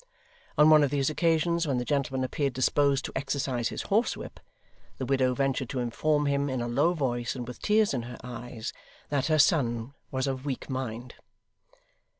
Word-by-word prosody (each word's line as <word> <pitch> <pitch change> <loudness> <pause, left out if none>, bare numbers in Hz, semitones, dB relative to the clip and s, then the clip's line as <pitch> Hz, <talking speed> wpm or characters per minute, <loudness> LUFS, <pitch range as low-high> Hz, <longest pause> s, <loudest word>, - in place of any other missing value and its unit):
On 150 +1 +7
one 155 -1 +7
of 145 - +2
these 140 +1 +1
occasions, 165 +1 +1
when 135 -3 +1
the 125 - -2
gentleman 135 -2 0
appeared 140 +1 -1
disposed 135 +2 +2
to - - -5
exercise 135 -3 -1
his - - -4
horsewhip, 220 +5 -1 0.6
the 130 - -3
widow 130 -1 +2
ventured 135 -2 0
to 130 - -3
inform 145 +5 +1
him 140 0 +1
in 130 -1 -2
a 120 - -2
low 145 +9 +2
voice 120 -5 -1
and 125 -2 -5
with 125 - -9
tears 215 -3 +3
in 125 - -1
her 120 - -8
eyes, 120 -2 -6 0.4
that 140 -1 0
her 155 -1 +3
son 125 -5 +2 0.2
was 130 0 -1
of 135 -1 -3
weak 140 -1 -4
mind. 125 -2 -4
135 Hz, 180 wpm, -28 LUFS, 125-145 Hz, 0.6 s, On